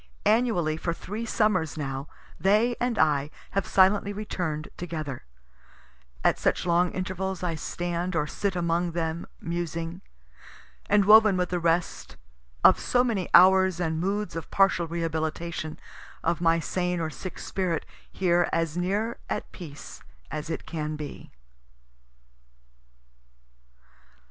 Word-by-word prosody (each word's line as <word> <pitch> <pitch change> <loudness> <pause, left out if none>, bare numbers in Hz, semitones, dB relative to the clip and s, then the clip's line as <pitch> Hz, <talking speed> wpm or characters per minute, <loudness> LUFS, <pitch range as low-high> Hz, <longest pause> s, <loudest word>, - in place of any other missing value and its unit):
Annually 210 -9 +2
for 170 +1 -2
three 220 +6 -5
summers 190 -9 +1
now, 135 -1 -4 0.3
they 210 +7 +3
and 245 -2 0
I 145 -2 +2 0.2
have 195 0 -1
silently 200 +1 +4
return'd 180 -7 -4
together; 155 - -5 1.0
at - - +3
such - - +1
long 175 +1 +3
intervals 185 0 -3
I 175 -2 0
stand 175 +2 -3
or 150 -2 +1
sit 195 +5 -2
among 170 0 0
them, 165 0 -2
musing 170 +1 -4 0.9
and 205 -1 +4
woven 215 -2 +7
with 180 -1 0
the 180 - -1
rest, 170 +1 -1 0.5
of - - +7
so 245 0 +2
many 215 -8 -1
hours 190 0 +6
and 160 -2 -1
moods 195 +1 -2
of 165 - -5
partial 190 -3 +3
rehabilitation 160 -1 -3 0.5
of 170 +1 0
my 165 -1 +4
sane 180 +2 -1
or 160 -1 -2
sick 185 +4 -7
spirit, 180 -4 -2 0.3
here 175 -2 +2
as 165 -1 0
near 200 +6 -1
at - - -3
peace 150 -6 -10 0.3
as 155 +1 -4
it 165 - -4
can 155 -2 -3
be. 150 -1 -8
175 Hz, 130 wpm, -27 LUFS, 160-190 Hz, 1.0 s, woven